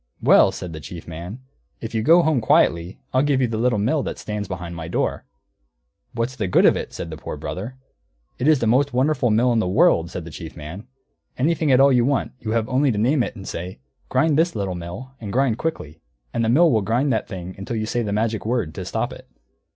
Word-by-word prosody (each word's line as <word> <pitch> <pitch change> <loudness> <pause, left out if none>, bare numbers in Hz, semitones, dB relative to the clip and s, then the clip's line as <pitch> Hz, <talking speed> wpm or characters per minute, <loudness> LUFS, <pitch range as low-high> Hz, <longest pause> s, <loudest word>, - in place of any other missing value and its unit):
"Well," - - +5
said 90 -2 -7
the 80 - -6
Chief 85 +1 -9
Man, 85 +9 -7 0.4
"if 115 0 -7
you'll 110 -1 0
go 170 +7 +6
home 155 -6 +2
quietly 85 -4 +2 0.2
I'll 130 - +4
give 140 -2 +2
you 130 - +3
the 110 -1 -3
Little 120 -1 +2
Mill 125 +9 +1
that - - -4
stands 105 -1 -4
behind 90 -2 -6
my 80 -1 -6
door." - - -2 0.9
"What's 115 +2 -2
the 105 -5 -2
good 90 - +4
of - - +6
it?" - - -5
said 85 - -6
the 80 - -6
Poor - - -6
Brother. 110 +8 -6 0.6
"It 130 - 0
is 155 -1 +6
the 120 - -1
most 130 +5 +2
wonderful 130 0 +2
mill 120 +3 +3
in 115 - +2
the 110 - 0
world," 95 - +3
said 90 -1 -6
the 85 - -9
Chief 80 +1 -9
Man. 80 +10 -8 0.5
"Anything 155 +2 +1
at 130 - +5
all 140 +1 +7
that 130 - +3
you 120 - +4
want, 140 0 0
you 110 - -6
have 110 0 0
only 135 +2 +2
to 105 - -2
name 125 +6 +2
it, 120 - -3
and 95 -3 -9
say, 90 +2 -6 0.3
'Grind 155 -1 +2
this, 170 -2 +1
Little 100 -3 -2
Mill, 90 +10 -7
and 105 -3 -5
grind 130 -1 +1
quickly,' 85 - -4 0.3
and 115 - 0
the 110 - +1
Mill 160 +7 +5
will 110 - +2
grind 120 +7 +1
that 110 - -1
thing 90 -2 -7
until 100 +4 -5
you 110 -1 -1
say 120 +2 -1
the 105 -3 -3
magic 110 +1 -1
word, 110 -8 -1
to - - -6
stop - - -2
it." - - -13
115 Hz, 245 wpm, -22 LUFS, 95-130 Hz, 0.9 s, all